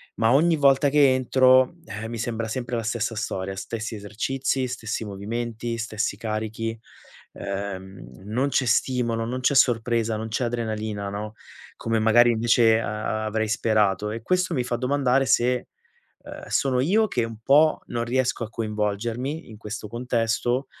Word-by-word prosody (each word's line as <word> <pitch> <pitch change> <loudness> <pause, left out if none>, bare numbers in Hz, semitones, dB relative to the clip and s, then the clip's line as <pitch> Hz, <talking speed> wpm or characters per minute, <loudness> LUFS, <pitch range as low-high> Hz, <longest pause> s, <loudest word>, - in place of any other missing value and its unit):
ma 115 +1 +3
ogni 165 +4 +4
volta 140 -1 +4
che 140 -2 +5
entro, 130 0 +5 0.2
uhm, 110 0 -6
mi 115 - -5
sembra 115 0 -3
sempre 120 +2 -3
la 115 - -1
stessa 115 0 -2
storia, 95 -2 -3
stessi 115 +3 -5
esercizi, 130 +6 -2
stessi 110 -3 -4
movimenti, 115 +3 -4
stessi 110 -3 -2
carichi, 110 +1 -3 0.6
uhm, 95 -6 -7
non 125 +7 0
c'è 130 -2 +1
stimolo, 115 -1 +1
non 125 +2 -3
c'è 130 - +2
sorpresa, 115 -3 +2
non 110 +1 -5
c'è 115 +3 -1
adrenalina, 110 -3 -3
no, 105 +2 -5 0.4
come 115 -1 -1
magari 120 +2 +5
invece 115 0 +4
a 110 0 -3
avrei 110 0 -1
sperato 105 -2 +1
e 115 +1 -5
questo 185 +4 +1
mi 125 - 0
fa 120 0 -2
domandare 135 +1 +2
se, 125 +1 +2 0.5
uhm, - - -10
sono 130 -2 +1
io 205 +11 +3
che 125 - -1
un 115 -1 -8
po' 150 +4 +4
non 120 -1 -2
riesco 125 0 0
a - - -11
coinvolgermi, 115 - -3
in 110 - -11
questo 105 0 -6
contesto 120 +2 -1
115 Hz, 155 wpm, -24 LUFS, 110-125 Hz, 0.6 s, che